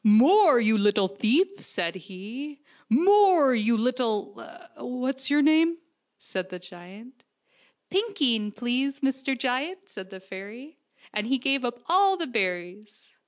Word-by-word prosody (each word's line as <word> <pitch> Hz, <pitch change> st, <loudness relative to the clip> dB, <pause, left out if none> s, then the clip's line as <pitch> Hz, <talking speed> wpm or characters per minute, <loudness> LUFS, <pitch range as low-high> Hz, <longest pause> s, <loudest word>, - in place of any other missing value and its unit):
"More, 275 Hz, -, +6 dB
you 220 Hz, -1 st, +2 dB
little 205 Hz, -1 st, +2 dB
thief!" 265 Hz, -, 0 dB
said 170 Hz, -3 st, -3 dB
he. 210 Hz, -, -9 dB, 0.3 s
"More,, 350 Hz, -, +4 dB
you 230 Hz, 0 st, +1 dB
little 230 Hz, -3 st, -1 dB, 0.4 s
what's 260 Hz, -1 st, -4 dB
your 290 Hz, +1 st, +3 dB
name? 325 Hz, +2 st, +3 dB, 0.2 s
" -, -, -53 dB
said 185 Hz, -1 st, -4 dB
the 180 Hz, -, -8 dB
giant, 190 Hz, +8 st, -15 dB, 0.4 s
" -, -, -37 dB
Pinkeen, 285 Hz, -, 0 dB
please, 255 Hz, +5 st, -3 dB
Mr. 265 Hz, 0 st, -2 dB
Giant," 285 Hz, +10 st, -3 dB
said 190 Hz, -, -11 dB
the 190 Hz, -1 st, -11 dB
fairy, 205 Hz, +10 st, -11 dB, 0.3 s
as 210 Hz, 0 st, -2 dB
he 270 Hz, +2 st, +1 dB
gave 270 Hz, +1 st, -1 dB
up 245 Hz, 0 st, -5 dB
all 385 Hz, +2 st, +3 dB
the 335 Hz, -, -3 dB
berries. 200 Hz, -, -4 dB
245 Hz, 140 wpm, -25 LUFS, 210-290 Hz, 0.4 s, More